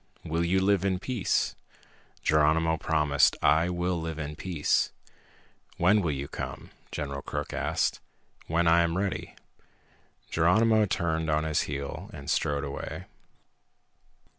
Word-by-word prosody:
"Will 85 +2 0
you 90 +3 +2
live 100 -1 +2
in 95 -2 +1
peace?" 115 +2 -1 0.7
Geronimo 80 +2 +3
promised, 75 -3 +2
"I 80 +4 +4
will 90 -1 -1
live 80 -1 -4
in 75 -1 -5
peace." 85 -3 0 0.9
"When 100 +5 +4
will 85 - 0
you 70 -1 -3
come?" - - -7 0.2
General 70 -2 -4
Crook - - -5
asked. - - 0 0.5
"When 85 +1 +1
I 85 +1 +6
am 85 0 0
ready." 100 0 -3 1.0
Geronimo 110 +6 +4
turned 80 -3 -1
on 75 0 +2
his 80 -1 +1
heel 70 +7 -5
and 70 -4 -5
strode 70 -1 0
away. 70 - -5
80 Hz, 130 wpm, -28 LUFS, 75-90 Hz, 1.0 s, I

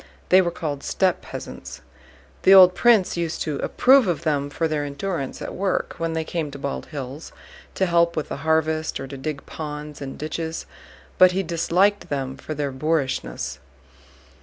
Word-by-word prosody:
They 185 +1 +7
were 175 - 0
called 150 -5 -4
steppe 185 +4 0
peasants. - - -8 0.6
The 195 - +7
old 185 -1 +9
prince 220 -5 +3
used 170 -1 -2
to 150 -3 -3
approve 260 - +4
of 170 -3 -1
them 145 -3 0
for 165 +3 -1
their 155 -2 -1
endurance 145 0 -4
at - - -6
work 190 0 -1
when 165 0 -1
they 160 0 -1
came 160 -2 -3
to 140 - -9
Bald 65 - -4
Hills 140 +1 -7 0.4
to 190 - +2
help 170 -1 +2
with 155 - -3
the - - -4
harvest, 160 0 0
or 135 - -5
to 135 +1 -8
dig 140 +1 -5
ponds 150 -1 -7
and 135 -1 -6
ditches, 160 +1 -4 0.5
but 185 0 +7
he 195 +1 0
disliked 180 +4 +1
them 135 -2 -3
for 155 - -7
their 145 -1 -2
boorishness. 130 - -2
160 Hz, 175 wpm, -23 LUFS, 145-175 Hz, 0.6 s, old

